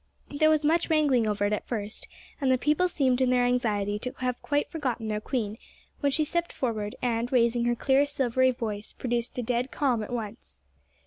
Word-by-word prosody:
There 310 +2 +3
was 305 -1 +2
much 330 +3 +2
wrangling 285 -8 +3
over 205 -1 0
it 205 - +1
at 210 - -3
first, 215 -2 -4 0.3
and 265 -2 +3
the 255 - +4
people 300 +7 +2
seemed 265 -6 +1
in 255 - +3
their 250 -1 +3
anxiety 210 -5 0
to 250 +3 -5
have 250 -1 -2
quite 290 0 0
forgotten 250 -8 -3
their 210 0 -2
queen, 220 -3 -3 0.4
when 285 -1 +1
she 310 - +1
stepped 340 +3 -1
forward, 215 -5 -2
and, 235 0 0
raising 235 -1 +3
her 240 0 +2
clear 270 +4 +3
silvery 260 -2 +2
voice, 215 -4 -4
produced 240 -1 -3
a 250 - -1
dead 245 +2 -1
calm 255 -6 0
at 215 - -6
once. 205 - -6
245 Hz, 200 wpm, -27 LUFS, 225-275 Hz, 0.4 s, the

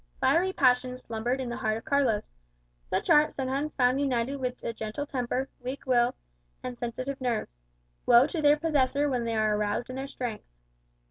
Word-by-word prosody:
Fiery 365 +3 +3
passions 255 -4 +2
slumbered 235 +3 -2
in 260 - -3
the 240 - -4
heart 215 0 0
of 225 - -10
Carlos. 280 -8 +1 0.6
Such - - -1
art 300 0 +6
sometimes 275 +3 -2
found 255 +1 +3
united 265 0 0
with 250 -2 -4
a 230 - -2
gentle 220 +6 -4
temper, 260 -1 -2
a - - -32
weak 260 +3 -5
will, 245 -2 +3 0.5
and 250 -1 -4
sensitive 255 +3 -4
nerves. 235 - -2 0.5
Woe 240 +1 +7
to 315 +2 -3
their 295 0 +5
possessor 290 -2 +1
when 250 -4 -1
they 230 -1 -1
are 215 -1 +2
aroused 210 +4 -1
in 255 - -6
their 270 +1 -4
strength! 245 -5 -5
255 Hz, 185 wpm, -28 LUFS, 235-275 Hz, 0.6 s, Woe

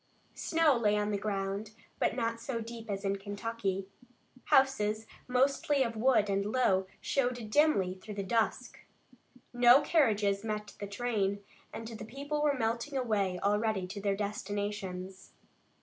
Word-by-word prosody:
Snow 320 -4 +2
lay 210 -3 +2
on 210 0 0
the 205 - 0
ground, 200 +1 -3 0.3
but - - +1
not 230 -1 -1
so 235 0 -3
deep 230 0 -8
as 200 0 -3
in 195 0 0
Kentucky. 200 -1 -3 0.6
Houses, 220 -5 +3 0.2
mostly 270 +2 +2
of 230 -2 -3
wood, 225 -2 +3
and 200 0 +1
low, 200 -4 +2
showed 245 -5 -1
dimly 215 -11 +3
through 195 +3 -9
the 200 - -2
dusk. 225 +3 -1 0.7
No 245 +2 +7
carriages 215 -10 +2
met 210 -1 -4
the 205 - -4
train, 200 -2 -1 0.3
and 225 - -7
the 225 -2 -7
people 285 +6 -4
were 290 -2 +2
melting 235 +4 -1
away 200 -7 0
already 210 -1 +1
to 200 +2 -7
their 200 -1 +1
destinations. 200 -2 -4
215 Hz, 145 wpm, -31 LUFS, 200-245 Hz, 0.7 s, No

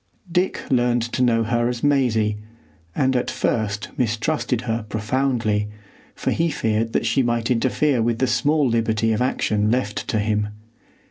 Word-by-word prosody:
Dick 180 +2 +1
learned 120 -2 +2
to 120 +2 -3
know 115 -2 +3
her 120 +1 +1
as 120 -1 -4
Maisie, 115 -7 +2 0.6
and 130 -2 +1
at 125 - 0
first 105 -2 -1
mistrusted 125 +2 0
her 115 -2 -2
profoundly, 110 -1 0 0.5
for - - -2
he 165 0 +1
feared 115 -4 -1
that - - +1
she 115 +4 +2
might 120 -1 0
interfere 130 +2 +1
with 115 0 +1
the 130 - +2
small 140 +4 +2
liberty 115 -1 +1
of 110 - -1
action 105 -4 +1
left 110 -3 -1
to - - 0
him. 105 0 0
115 Hz, 155 wpm, -22 LUFS, 110-130 Hz, 0.6 s, know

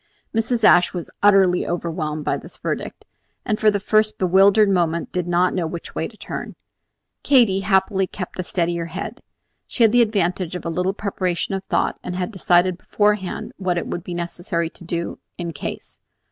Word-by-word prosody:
Mrs. 225 +1 0
Ashe 175 -3 +6
was 175 - -5
utterly 195 -3 +4
overwhelmed 160 -3 -3
by - - +1
this - - -8
verdict, - - -4 0.4
and 215 - 0
for 215 - +5
the 205 -1 0
first 215 +2 +2
bewildered 195 +3 +5
moments 170 -3 0
did 180 -1 -2
not 175 +1 +2
know 175 -3 -1
which 170 +1 -7
way - - -2
to - - -17
turn. - - -6 0.7
Katy, 235 -9 +4
happily, 190 0 +2
kept 185 0 -7
a - - 0
steadier 170 -1 -1
head. 185 +5 -6 0.5
She 240 - +1
had 225 - +6
the 245 +1 +5
advantage 185 -5 0
of 180 - -6
a - - -1
little 180 +3 0
preparation 185 -3 -2
of 195 0 -3
thought, - - 0
and 180 - -4
had 180 +3 -2
decided 180 -2 +2
beforehand 210 -3 0
what 185 -2 -1
it - - -2
would 175 - -4
be 175 - -6
necessary 170 -1 -3
to - - -13
do 170 0 -4 0.2
"in 170 -2 -4
case." 145 - -7
185 Hz, 185 wpm, -22 LUFS, 175-200 Hz, 0.7 s, Ashe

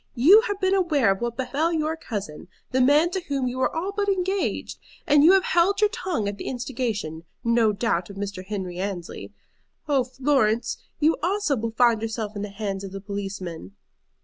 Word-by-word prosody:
You 340 - +7
have 410 -1 -3
been 380 0 +2
aware 310 - +3
of 195 - -2
what 235 -1 -3
befell 280 +6 0
your 315 -1 0
cousin, 200 - -6 0.2
the 260 0 +2
man 295 +6 +4
to 380 - -2
whom 275 -3 -1
you 250 +1 -4
were 260 - +2
all 350 +5 -3
but 405 0 -1
engaged. 380 0 -1 0.3
And 290 0 +5
you 345 +5 +8
have 385 -1 +4
held 370 +4 +2
your 420 -1 +3
tongue 360 - -2
at 200 0 -4
the - - -6
instigation, 230 - -3 0.2
no 230 -2 +3
doubt, 205 -4 -1
of 200 - -9
Mr. 195 -1 -5
Henry 185 -3 -5
Annesley. 190 -3 -5 0.6
Oh, 275 -3 +3
Florence, 255 -3 +1 0.2
you 315 +2 +3
also 380 -3 +1
will 230 -1 -2
find 235 -3 +4
yourself 220 -1 -4
in 200 - -4
the 210 - -4
hands 200 -1 -4
of 195 -1 -7
the 195 - -5
policeman!" 195 - -6
245 Hz, 195 wpm, -24 LUFS, 200-325 Hz, 0.6 s, you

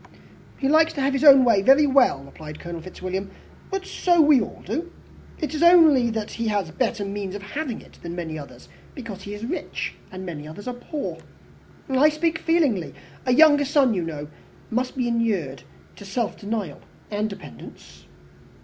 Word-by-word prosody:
"He 270 - -1
likes 320 +3 +4
to 280 - -3
have 270 +1 +1
his 275 - -1
own 275 -3 +8
way 225 -5 +4
very 270 +7 +6
well," 265 - +3
replied 150 +2 -11
Colonel 170 -1 -7
Fitzwilliam. 185 +2 -5 0.4
"But 385 -1 -3
so 350 -2 +1
we 295 -5 +6
all - - -7
do. 345 +2 -4 0.5
It 305 -3 -3
is 305 - -3
only 320 -8 +6
that 220 -2 -4
he 230 -1 -3
has 200 -6 -1
better 225 -3 -1
means 200 -1 -5
of 200 - -7
having 265 +3 -4
it - - -19
than 170 0 -6
many 165 -3 -5
others, 130 -4 -12 0.3
because 230 -8 -8
he 200 +1 -7
is 210 +2 -6
rich, 320 +9 -4 0.2
and 185 0 -7
many 150 -4 -7
others 180 +8 -10
are 250 - -2
poor. 280 +4 -6 0.7
I 270 +3 +4
speak 320 +1 -1
feelingly. 300 - +1 0.3
A - - +3
younger 290 -1 +6
son, 275 -3 +3
you 185 - -1
know, 150 -3 -5 0.4
must 250 +3 -2
be 250 -2 0
inured 210 - -1 0.4
to - - -10
self 220 +3 -2
denial 205 -7 -4 0.3
and 210 +1 -1
dependence." 190 - -12
230 Hz, 180 wpm, -23 LUFS, 190-285 Hz, 0.7 s, own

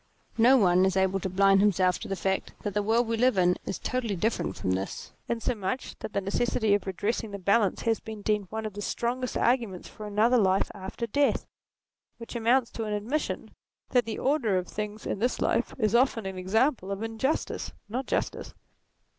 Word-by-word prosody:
No 250 +4 +7
one 185 -4 +4
is 190 0 +2
able 190 0 +2
to 190 - -3
blind 195 +1 +4
himself 185 -3 +3
to - - -7
the 195 - -2
fact 190 +1 -2
that 205 - -2
the 210 - +1
world 225 +3 +2
we 230 0 0
live 250 -2 +3
in 180 -1 +4
is - - -2
totally 240 -5 -2
different 220 +6 -1
from 95 - -1
this; 95 +1 -3 0.2
insomuch 235 0 -2
that - - -6
the 200 - 0
necessity 215 +2 +1
of 205 -1 0
redressing 210 +4 -2
the 200 - -5
balance 200 +1 +2
has 225 -2 +1
been 220 -2 -8
deemed 210 -2 0
one 220 0 -4
of 215 - -4
the 205 - -6
strongest 245 +4 -2
arguments 230 -7 0
for 215 - -9
another 220 +4 +3
life 190 -2 +2
after 195 +4 -5
death, 285 +5 +1 0.7
which 230 +1 -9
amounts 235 +2 +2
to 225 - -4
an 210 - -2
admission 230 +9 -2 0.4
that 245 -2 +3
the 225 -1 -4
order 260 -8 +1
of 180 - -2
things 210 0 -5
in - - -2
this 245 +4 0
life 240 - 0
is 215 -4 +1
often 240 -3 +3
an 190 -1 -4
example 220 +3 +1
of 200 +2 -3
injustice, 225 +7 -2 0.2
not 245 +5 -3
justice. - - -2
215 Hz, 195 wpm, -28 LUFS, 195-235 Hz, 0.7 s, No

